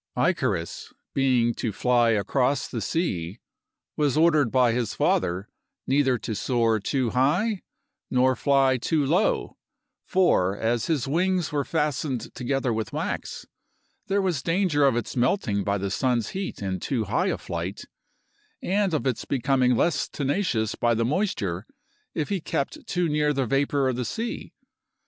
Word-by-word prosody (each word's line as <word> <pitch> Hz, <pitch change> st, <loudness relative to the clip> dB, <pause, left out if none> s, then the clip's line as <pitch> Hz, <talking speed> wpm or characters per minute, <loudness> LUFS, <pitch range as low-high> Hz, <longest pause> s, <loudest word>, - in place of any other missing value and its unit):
Icarus, 85 Hz, 0 st, -1 dB, 0.2 s
being 125 Hz, -3 st, +2 dB
to 115 Hz, -, -3 dB
fly 120 Hz, +3 st, +2 dB
across 125 Hz, +6 st, +1 dB
the 115 Hz, -, -4 dB
sea, 100 Hz, -, -2 dB, 0.6 s
was 145 Hz, -1 st, +1 dB
ordered 155 Hz, -6 st, +4 dB
by 125 Hz, -2 st, +4 dB
his 120 Hz, -1 st, -2 dB
father 90 Hz, +4 st, +1 dB, 0.4 s
neither 135 Hz, -2 st, +2 dB
to 115 Hz, -, -5 dB
soar 115 Hz, 0 st, +1 dB
too 125 Hz, +3 st, -1 dB
high 180 Hz, -, +1 dB, 0.5 s
nor 130 Hz, +1 st, +3 dB
fly 135 Hz, 0 st, +3 dB
too 150 Hz, +4 st, 0 dB
low, 175 Hz, +10 st, +1 dB, 0.5 s
for, 100 Hz, -, +2 dB
as 115 Hz, +1 st, 0 dB
his 150 Hz, -6 st, 0 dB
wings 180 Hz, +3 st, +1 dB
were 145 Hz, -1 st, 0 dB
fastened 150 Hz, -4 st, -2 dB
together 130 Hz, 0 st, -1 dB
with 110 Hz, -2 st, -3 dB
wax, -, -, -4 dB, 0.6 s
there 200 Hz, 0 st, +1 dB
was 175 Hz, -8 st, 0 dB
danger 165 Hz, -3 st, +2 dB
of 135 Hz, -, +2 dB
its 120 Hz, -, -3 dB
melting 120 Hz, -, +1 dB
by 100 Hz, +1 st, 0 dB
the 100 Hz, 0 st, -3 dB
sun's 120 Hz, 0 st, 0 dB
heat 190 Hz, -, -5 dB
in 95 Hz, -1 st, -2 dB
too 120 Hz, +4 st, -1 dB
high -, -, 0 dB
a -, -, 0 dB
flight, -, -, -5 dB, 0.8 s
and 195 Hz, -2 st, 0 dB
of 140 Hz, -, -2 dB
its 130 Hz, -4 st, -1 dB
becoming 130 Hz, -1 st, +2 dB
less 140 Hz, +4 st, +1 dB
tenacious 140 Hz, -, -1 dB
by 120 Hz, -1 st, +1 dB
the 115 Hz, +1 st, +1 dB
moisture 115 Hz, -, -1 dB, 0.5 s
if 155 Hz, -, -2 dB
he 195 Hz, -3 st, -1 dB
kept 140 Hz, -, -3 dB
too 180 Hz, -2 st, 0 dB
near 150 Hz, -1 st, +1 dB
the 135 Hz, -2 st, 0 dB
vapor 140 Hz, +2 st, +1 dB
of 130 Hz, -2 st, -1 dB
the 125 Hz, -, -2 dB
sea. 230 Hz, -, -4 dB
130 Hz, 155 wpm, -25 LUFS, 115-155 Hz, 0.8 s, ordered